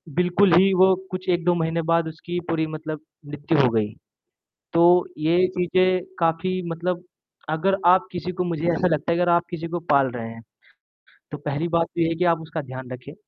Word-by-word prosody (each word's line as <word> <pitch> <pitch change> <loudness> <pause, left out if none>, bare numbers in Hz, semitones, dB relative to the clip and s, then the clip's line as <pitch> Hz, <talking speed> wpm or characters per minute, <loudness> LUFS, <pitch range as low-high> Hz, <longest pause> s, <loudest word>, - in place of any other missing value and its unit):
बिल्कुल 180 +1 +3
ही 195 +1 +4
वो 190 +1 +5 0.2
कुछ 185 0 -5
1-2 175 0 +2
महीने 165 0 -1
बाद 165 -1 +2
उसकी 175 +2 -5
पूरी 160 -1 0
मतलब 155 0 -6 0.3
मृत्यु 145 +2 -2
हो 125 - +4
गई। 110 -2 0 0.8
तो 170 0 +4 0.3
ये 170 +4 +3
चीज़ें 185 +1 +2 0.2
काफ़ी 170 +3 0
मतलब 175 +2 -3 0.5
अगर 190 +5 +1
आप 185 +1 +5
किसी 180 0 -4
को 180 0 -2
मुझे 170 -2 -3
ऐसा 170 +2 +1
लगता 155 -1 0
है 170 - +1
अगर 175 0 +2
आप 170 0 +3
किसी 170 -1 -5
को 175 - -1
पाल 140 -2 +4
रहे 115 -2 -6
हैं, 115 0 -10 0.9
तो 150 - -5
पहली 145 +3 -3
बात 170 -1 +1
तो 170 - -4
ये 165 - +3
है 165 - -1
कि 180 +2 0
आप 165 -1 +3
उसका 160 0 -5
ध्यान 130 -1 -9
रखें, 125 +3 -9
165 Hz, 200 wpm, -23 LUFS, 155-180 Hz, 0.9 s, वो